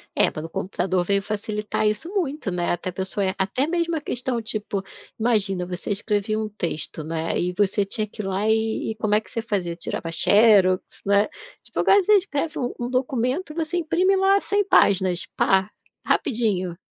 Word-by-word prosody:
É, -, -, +4 dB
pelo 160 Hz, +2 st, -6 dB
computador, 185 Hz, +1 st, -1 dB
veio 200 Hz, +1 st, +2 dB
facilitar 210 Hz, +1 st, -2 dB
isso 215 Hz, +11 st, -2 dB
muito, 305 Hz, -, -2 dB
né, 175 Hz, -1 st, -1 dB
até 175 Hz, +1 st, -2 dB
a -, -, -8 dB
pessoa 190 Hz, +2 st, -2 dB
é 190 Hz, -, -1 dB
até 200 Hz, +9 st, 0 dB
mesmo 335 Hz, 0 st, 0 dB
a 310 Hz, -, -2 dB
questão, 250 Hz, -3 st, -2 dB
tipo, 210 Hz, -3 st, -2 dB, 0.4 s
imagina, 200 Hz, -5 st, +1 dB
você 180 Hz, +3 st, -5 dB
escrevia 210 Hz, +1 st, 0 dB
um 215 Hz, 0 st, -2 dB
texto, 165 Hz, -6 st, -4 dB
né, 160 Hz, +1 st, -2 dB
e 180 Hz, +1 st, -1 dB
você 205 Hz, 0 st, +2 dB
tinha 215 Hz, +2 st, -1 dB
que 215 Hz, -, -7 dB
ir -, -, -6 dB
lá 195 Hz, +2 st, -1 dB
e 220 Hz, 0 st, 0 dB
e -, -, -6 dB
como 215 Hz, -1 st, -1 dB
é 215 Hz, -, +3 dB
que -, -, -20 dB
você 230 Hz, -, -3 dB
fazia? 195 Hz, -7 st, -2 dB
Tirava 165 Hz, -1 st, -4 dB
xerox, 200 Hz, 0 st, +5 dB, 0.2 s
né. 200 Hz, +1 st, +3 dB, 0.3 s
Tipo, -, -, -6 dB
agora 400 Hz, 0 st, +5 dB
você 425 Hz, -, +4 dB
escreve 315 Hz, -4 st, -2 dB
um 245 Hz, -2 st, -2 dB
um 240 Hz, 0 st, -3 dB
documento 255 Hz, +5 st, -1 dB
e -, -, -17 dB
você 330 Hz, +1 st, -2 dB
imprime 350 Hz, +3 st, +2 dB
lá 385 Hz, +1 st, +4 dB
100 410 Hz, 0 st, +1 dB
páginas, 185 Hz, -, +3 dB
pá, 190 Hz, +1 st, +2 dB, 0.4 s
rapidinho. 195 Hz, -8 st, 0 dB
210 Hz, 190 wpm, -23 LUFS, 190-255 Hz, 0.4 s, xerox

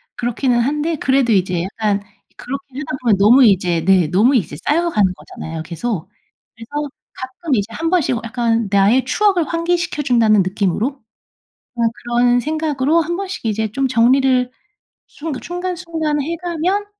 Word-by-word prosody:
그렇기는 245 Hz, 0 st, 0 dB
한데 300 Hz, +6 st, 0 dB
그래도 265 Hz, -3 st, +2 dB
이제 180 Hz, -3 st, +1 dB
약간 205 Hz, +1 st, -1 dB, 0.4 s
그렇게 275 Hz, +2 st, -6 dB
하다 270 Hz, -3 st, -4 dB
보면 230 Hz, -5 st, +3 dB
너무 235 Hz, +6 st, +6 dB
이제 180 Hz, -5 st, +2 dB
네 185 Hz, -3 st, +4 dB
너무 220 Hz, -, +3 dB
이제 170 Hz, -10 st, -1 dB
쌓여가는 295 Hz, -, +2 dB
거잖아요, 160 Hz, -3 st, -8 dB
계속. 180 Hz, +2 st, -4 dB, 0.5 s
그래서 285 Hz, +6 st, -5 dB, 0.2 s
가끔 260 Hz, +3 st, -3 dB
이제 205 Hz, -2 st, -1 dB
한 325 Hz, +7 st, -2 dB
번씩 330 Hz, -8 st, +1 dB
약간 230 Hz, -1 st, 0 dB
나의 205 Hz, +6 st, +3 dB
추억을 370 Hz, +3 st, +2 dB
환기시켜 340 Hz, -2 st, -1 dB
준다는 225 Hz, -5 st, +4 dB
느낌으로 195 Hz, +4 st, 0 dB, 0.9 s
어 235 Hz, -, -3 dB
그런 240 Hz, 0 st, +1 dB
생각으로 305 Hz, +2 st, 0 dB
한 340 Hz, +2 st, -3 dB
번씩 380 Hz, -9 st, -6 dB
이제 220 Hz, -1 st, -1 dB
좀 270 Hz, +2 st, 0 dB
정리를 255 Hz, +1 st, +3 dB, 0.6 s
순 315 Hz, 0 st, -7 dB
순간순간 335 Hz, -4 st, -3 dB
해 335 Hz, +4 st, -3 dB
가면 355 Hz, +4 st, -1 dB
255 Hz, 320 characters per minute, -18 LUFS, 215-315 Hz, 0.9 s, 너무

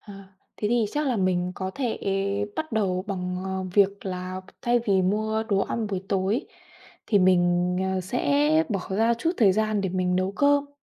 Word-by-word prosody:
Ờ, 205 Hz, -2 st, -12 dB, 0.4 s
thế 210 Hz, -, -1 dB
thì 235 Hz, -1 st, +2 dB
chắc 300 Hz, 0 st, -1 dB
là 250 Hz, -, +1 dB
mình 180 Hz, -2 st, 0 dB
có 190 Hz, +1 st, -4 dB
thể 255 Hz, -5 st, -2 dB, 0.6 s
bắt 315 Hz, -4 st, -4 dB
đầu 190 Hz, -4 st, 0 dB
bằng, 180 Hz, -1 st, -3 dB
ờ, 190 Hz, 0 st, -3 dB
việc 200 Hz, 0 st, +3 dB
là 185 Hz, 0 st, -4 dB
b -, -, -16 dB
thay 240 Hz, -1 st, +3 dB
vì 195 Hz, -2 st, +3 dB
mua 215 Hz, +3 st, 0 dB
đồ 205 Hz, -3 st, 0 dB
ăn 225 Hz, +2 st, -2 dB
buổi 195 Hz, -2 st, -4 dB
tối, 200 Hz, -, 0 dB, 0.6 s
thì 205 Hz, -, +3 dB
mình, 180 Hz, -1 st, +3 dB, 0.2 s
ờ, 190 Hz, -, 0 dB
sẽ 285 Hz, -, +2 dB
bỏ 200 Hz, -5 st, -1 dB
ra 225 Hz, +4 st, +2 dB
chút 325 Hz, +8 st, -1 dB
thời 205 Hz, -5 st, +5 dB
gian 215 Hz, +1 st, 0 dB
để 195 Hz, -, -1 dB
mình 180 Hz, 0 st, 0 dB
nấu 185 Hz, +1 st, 0 dB
cơm. 285 Hz, +3 st, +2 dB
200 Hz, 195 wpm, -25 LUFS, 185-230 Hz, 0.6 s, thời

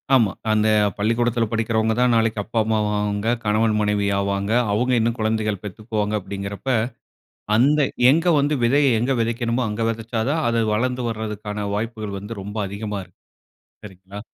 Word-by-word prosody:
ஆமா. 110 Hz, -6 st, +4 dB, 0.2 s
அந்த 110 Hz, 0 st, +2 dB, 0.3 s
பள்ளிக்கூடத்துல 115 Hz, +2 st, +1 dB
படிக்கிறவங்க 110 Hz, 0 st, +1 dB
தான் 125 Hz, -1 st, +3 dB
நாளைக்கு 110 Hz, -1 st, +1 dB
அப்பா, 115 Hz, +1 st, -2 dB
அம்மா 110 Hz, 0 st, 0 dB
ஆவாங்க. 105 Hz, 0 st, -1 dB, 0.2 s
கணவன், 110 Hz, +1 st, +2 dB
மனைவி 105 Hz, -1 st, +1 dB
ஆவாங்க. 100 Hz, +1 st, -1 dB, 0.2 s
அவுங்க 125 Hz, +5 st, +1 dB
இன்னும் 115 Hz, +2 st, 0 dB
குழந்தைகள் 110 Hz, -2 st, -1 dB
பெத்துக்குவாங்க 105 Hz, +1 st, -3 dB
அப்டிங்கறப்ப, 100 Hz, +6 st, -6 dB, 0.9 s
அந்த 145 Hz, +5 st, +4 dB, 0.3 s
எங்க 165 Hz, +3 st, +1 dB
வந்து 145 Hz, +1 st, +1 dB
விதைய 135 Hz, -1 st, +3 dB
எங்கு 130 Hz, +2 st, +1 dB
விதைக்கணுமோ 115 Hz, +2 st, -1 dB
அங்கு 115 Hz, +2 st, -2 dB
விதச்சா 115 Hz, 0 st, -3 dB
தான், 160 Hz, +1 st, 0 dB
அது 115 Hz, 0 st, +1 dB
வளர்ந்து 125 Hz, +2 st, -1 dB
வர்தற்கான 105 Hz, -2 st, -4 dB
வாய்ப்புகள் 110 Hz, -2 st, -4 dB
வந்து 105 Hz, 0 st, -7 dB
ரொம்ப 105 Hz, +2 st, -7 dB
அதிகமா 105 Hz, 0 st, -4 dB
இருக்கும். 90 Hz, -, -26 dB, 0.7 s
சரிங்களா. 95 Hz, +1 st, -10 dB
110 Hz, 145 wpm, -22 LUFS, 105-115 Hz, 0.9 s, ஆமா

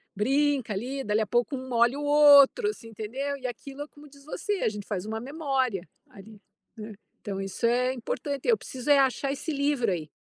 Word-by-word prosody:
Brinca 270 Hz, +1 st, +1 dB
ali, 260 Hz, +7 st, -4 dB
dali 210 Hz, +1 st, +1 dB
a -, -, 0 dB
pouco 240 Hz, +6 st, 0 dB
um 260 Hz, 0 st, -7 dB
molha 240 Hz, +2 st, +2 dB
o 295 Hz, -, -4 dB
outro, 290 Hz, -, +6 dB
assim, 230 Hz, -, -8 dB
entendeu? 255 Hz, +7 st, -4 dB
E 255 Hz, -, -5 dB
aquilo, 270 Hz, +4 st, -8 dB
é 295 Hz, -, -5 dB
como 295 Hz, 0 st, -16 dB
diz 280 Hz, 0 st, -18 dB
você, 410 Hz, +7 st, -3 dB
a -, -, +2 dB
gente 210 Hz, -1 st, -7 dB
faz 200 Hz, -3 st, -4 dB
uma 220 Hz, +1 st, -4 dB
memória 265 Hz, -, -2 dB, 0.2 s
ali, 210 Hz, +1 st, -14 dB, 0.4 s
né. 215 Hz, 0 st, -8 dB, 0.3 s
Então 200 Hz, -2 st, -5 dB
isso 195 Hz, +4 st, -3 dB
é 250 Hz, +2 st, +2 dB
importante, 265 Hz, +2 st, -4 dB
eu 460 Hz, -, +4 dB
preciso 255 Hz, +2 st, -7 dB
é 285 Hz, -, +6 dB
achar 270 Hz, +1 st, +1 dB
esse 300 Hz, +3 st, -4 dB
livro 280 Hz, -6 st, 0 dB
aí. 165 Hz, -4 st, -3 dB
260 Hz, 205 wpm, -27 LUFS, 220-285 Hz, 0.4 s, outro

